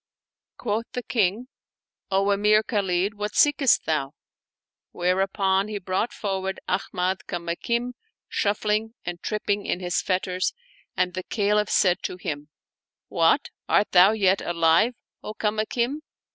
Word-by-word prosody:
Quoth 225 Hz, 0 st, -2 dB
the 250 Hz, -, -3 dB
King, 220 Hz, +2 st, 0 dB, 0.3 s
" -, -, -65 dB
O 195 Hz, +1 st, +2 dB
Emir 210 Hz, +2 st, +4 dB
Khalid, 195 Hz, -3 st, 0 dB
what 210 Hz, +1 st, -5 dB
seekest 290 Hz, -3 st, +4 dB
thou? 150 Hz, -3 st, -1 dB, 0.4 s
" -, -, -68 dB, 0.3 s
whereupon 190 Hz, +2 st, +1 dB
he 215 Hz, -1 st, -4 dB
brought 190 Hz, +4 st, -1 dB
forward 190 Hz, -2 st, -3 dB
Ahmad 185 Hz, 0 st, -1 dB
Kamakim, 200 Hz, +8 st, -2 dB, 0.3 s
shuf 205 Hz, 0 st, 0 dB
fling 215 Hz, +2 st, 0 dB
and 175 Hz, 0 st, -5 dB
tripping 205 Hz, -1 st, -2 dB
in -, -, -1 dB
his 180 Hz, -1 st, -1 dB
fetters, 185 Hz, -1 st, -1 dB, 0.4 s
and 180 Hz, 0 st, +1 dB
the 185 Hz, -, -3 dB
Caliph 210 Hz, +1 st, 0 dB
said 180 Hz, -2 st, +3 dB
to 180 Hz, -, -4 dB
him, 150 Hz, -5 st, -5 dB, 0.3 s
" -, -, -68 dB, 0.3 s
What! -, -, +2 dB, 0.2 s
art 210 Hz, -, +3 dB
thou 185 Hz, +2 st, +7 dB
yet 195 Hz, -3 st, +2 dB
alive, 170 Hz, +7 st, +2 dB, 0.3 s
O 215 Hz, -, -7 dB
Kamakim 230 Hz, +7 st, -1 dB
195 Hz, 140 wpm, -25 LUFS, 180-215 Hz, 0.4 s, thou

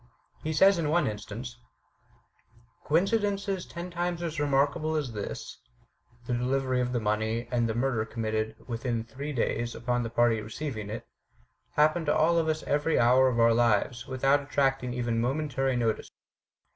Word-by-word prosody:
He 155 Hz, -, -2 dB
says 190 Hz, +4 st, +5 dB
in 155 Hz, -3 st, 0 dB
one 170 Hz, +3 st, +3 dB
instance: 110 Hz, +4 st, -6 dB, 1.3 s
Coincidences 195 Hz, +2 st, +1 dB
ten 175 Hz, +1 st, -7 dB
times 175 Hz, 0 st, -2 dB
as 165 Hz, -2 st, -3 dB
remarkable 145 Hz, +2 st, +1 dB
as 145 Hz, -5 st, -1 dB
this 105 Hz, -2 st, -6 dB, 0.7 s
(the 125 Hz, -, -2 dB
delivery 130 Hz, +1 st, 0 dB
of 125 Hz, 0 st, -1 dB
the 125 Hz, -, 0 dB
money, 110 Hz, +2 st, -1 dB
and 120 Hz, -2 st, +1 dB
murder 120 Hz, -2 st, +1 dB
committed 110 Hz, -1 st, -2 dB
within 115 Hz, -1 st, -2 dB
three 140 Hz, +5 st, -6 dB
days 120 Hz, -2 st, -1 dB
upon 120 Hz, +1 st, -1 dB
the 115 Hz, -, -3 dB
party 115 Hz, -1 st, +2 dB
receiving 110 Hz, -1 st, -5 dB
it) 110 Hz, +2 st, -6 dB, 0.7 s
happen 155 Hz, +3 st, +3 dB
to 150 Hz, -, +2 dB
all 165 Hz, +2 st, +4 dB
of 160 Hz, -, 0 dB
us 155 Hz, 0 st, -1 dB
every 150 Hz, +2 st, +1 dB
hour 125 Hz, +2 st, +5 dB
of 120 Hz, -2 st, 0 dB
our 115 Hz, 0 st, +5 dB
lives, 120 Hz, +1 st, +1 dB
without 135 Hz, +2 st, +2 dB
attracting 135 Hz, -2 st, 0 dB
even 120 Hz, -2 st, 0 dB
momentary 135 Hz, 0 st, 0 dB
notice. 115 Hz, -2 st, -1 dB
130 Hz, 155 wpm, -28 LUFS, 115-155 Hz, 1.3 s, says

